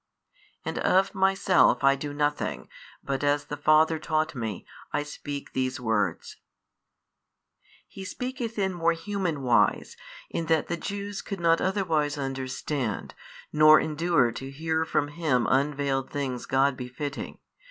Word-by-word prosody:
And - - -3
of 190 +1 +3
Myself 190 -4 +3
I 135 0 +6
do 145 +1 -5
nothing, 145 0 -2 0.4
but 135 0 -2
as 145 0 +1
the 145 - -5
Father 155 +2 +4
taught 155 0 0
Me, 110 -7 -5 0.3
I 145 - 0
speak 145 -1 -7
these 130 0 -1
words. 110 -4 -1 1.5
He 195 - -9
speaketh 245 +2 -5
in 190 -2 0
more 170 -1 +2
human 170 -4 -3
wise, 125 -2 +2 0.4
in 165 - -3
that 160 -1 +1
the 170 - 0
Jews 200 +2 -5
could 200 -2 -6
not 165 -1 +3
otherwise 165 -7 0
understand, 135 -3 -3 0.4
nor 155 0 +8
endure 155 -5 +1
to 135 +3 -7
hear 160 +3 -1
from 145 -2 0
Him 145 -6 0
unvailed 140 -1 0
things 130 -4 -3
God 135 +1 +2
befitting. 130 +3 -6
150 Hz, 135 wpm, -27 LUFS, 135-170 Hz, 1.5 s, nor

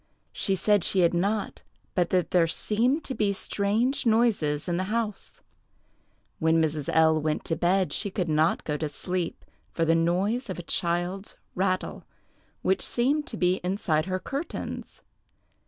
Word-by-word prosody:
She 195 - 0
said 205 0 +2
she 190 - +3
had 170 0 +3
not, 200 +4 -1 0.3
but 175 -2 +1
that 180 -2 +1
there 170 -2 +4
seemed 240 - +1
to 265 - -1
be 205 -5 +1
strange 210 +7 0
noises 220 - +2
in 175 -1 0
the 185 - -1
house. 215 0 -3 1.0
When 160 0 +3
Mrs. 155 -3 -1
L—— 160 -1 +4
went 155 0 -1
to 165 - 0
bed, 185 +2 +1
she 205 - 0
could 185 -3 -2
not 155 +1 +2
go 150 -1 -2
to 155 0 -3
sleep 180 +3 -3 0.2
for 165 - -1
the 165 - +3
noise 190 +9 +1
of 185 - -4
a 175 - -6
child's 175 +4 -2 0.2
rattle, 185 0 -1 0.6
which 190 - +2
seemed 280 +5 +2
to 220 - -5
be 180 0 +1
inside 180 -4 0
her 185 0 -1
curtains. 280 - -6
185 Hz, 160 wpm, -27 LUFS, 165-210 Hz, 1.0 s, there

